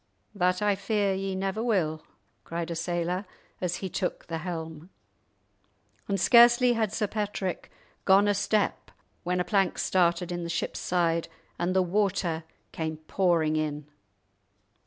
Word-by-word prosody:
"That 180 -1 +1
I 205 -1 +3
fear 200 0 0
ye 190 0 -3
never 195 +3 -2
will," 165 -9 0 0.4
cried 170 0 -4
a - - -2
sailor 175 +2 -2 0.4
as 180 -1 -1
he - - -1
took 185 0 -3
the 165 -1 -4
helm, 160 -1 -6 1.2
and 195 -1 0
scarcely 240 +4 +6
had 220 -3 0
Sir 215 - 0
Patrick 205 -3 -3 0.3
gone 195 +1 +5
a 205 - +3
step 205 +1 0 0.3
when 180 +1 0
a - - +2
plank 195 -2 +1
started 175 -1 +1
in 175 0 -3
the 170 - -5
ship's 170 - -2
side 170 -2 0 0.3
and 180 +2 0
the 190 - +4
water 180 -4 0 0.3
came 160 -1 -3
pouring 160 -1 +1
in. 150 -1 -2
180 Hz, 145 wpm, -27 LUFS, 170-200 Hz, 1.2 s, scarcely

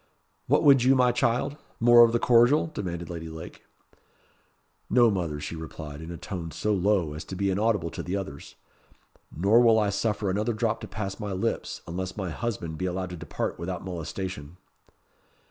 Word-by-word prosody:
"What - - +3
would 135 -4 +6
you, 130 +2 +5
my 125 -1 +4
child? 125 +4 0 0.2
more 120 0 +8
of 115 - +4
the 120 - +2
cordial?" 120 +7 +4
demanded 85 -3 -4
Lady 80 -1 -6
Lake. 80 0 -9 1.3
"No, 120 -2 +5
mother," 85 -7 -2
she 75 - -5
replied, 80 -2 -8
in 80 - -8
a 85 - -6
tone 85 -4 -6
so 105 +7 -1
low 95 -5 +1
as 75 - -6
to 95 - -7
be 100 +1 0
inaudible 100 -4 0
to - - -5
the 95 +2 -2
others. 95 -8 -7 0.8
"Nor 100 +8 +4
will 115 -2 +5
I 105 -2 +2
suffer 105 -1 -1
another 105 +4 0
drop 110 0 -1
to - - -6
pass 95 -2 -5
my 105 -2 -4
lips 110 +5 -3
unless 95 +3 -5
my 95 -4 -3
husband 85 -6 -4
be 95 - -1
allowed 90 0 -3
to - - -5
depart 80 -2 -4
without 90 +1 -4
molestation." 90 -2 -6
95 Hz, 180 wpm, -27 LUFS, 85-115 Hz, 1.3 s, more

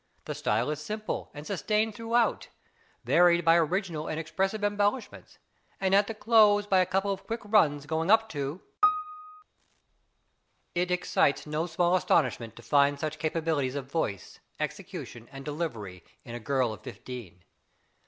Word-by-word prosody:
The - - -4
style 115 +7 0
is 150 0 -4
simple 215 +6 -4
and 145 0 -9
sustained 210 +3 0
throughout, 230 +1 0 0.6
varied 175 0 +4
by 165 0 +6
original 170 -1 0
and 155 - -3
expressive 195 +6 -2
embellishments, 205 +3 -1 0.4
and 190 0 +1
at 200 +1 +5
the 225 - -5
close 210 -2 +5
by 195 -2 +3
a 185 - +3
couple 195 +2 0
of 195 0 -10
quick 230 +2 -3
runs 155 -9 +3
going 160 +3 -1
up 220 +1 +5
to 145 +3 -4
[See - - -36 2.0
Page 175 - 0
Image] 180 - -1
It - - -3
excites 180 -5 +1
no 155 +3 -2
small 175 +1 +2
astonishment 125 - +1
to 120 - -13
find 140 +3 +3
such 155 +1 -4
capabilities 155 -4 -1
of 140 -1 -6
voice, 105 - -3 0.2
execution, 120 0 -6
and 135 -1 -9
delivery 115 - -5 0.2
in 120 - -8
a 120 - -5
girl 130 -1 0
of 105 - -11
fifteen. 105 -7 -9
165 Hz, 160 wpm, -28 LUFS, 140-200 Hz, 2.0 s, by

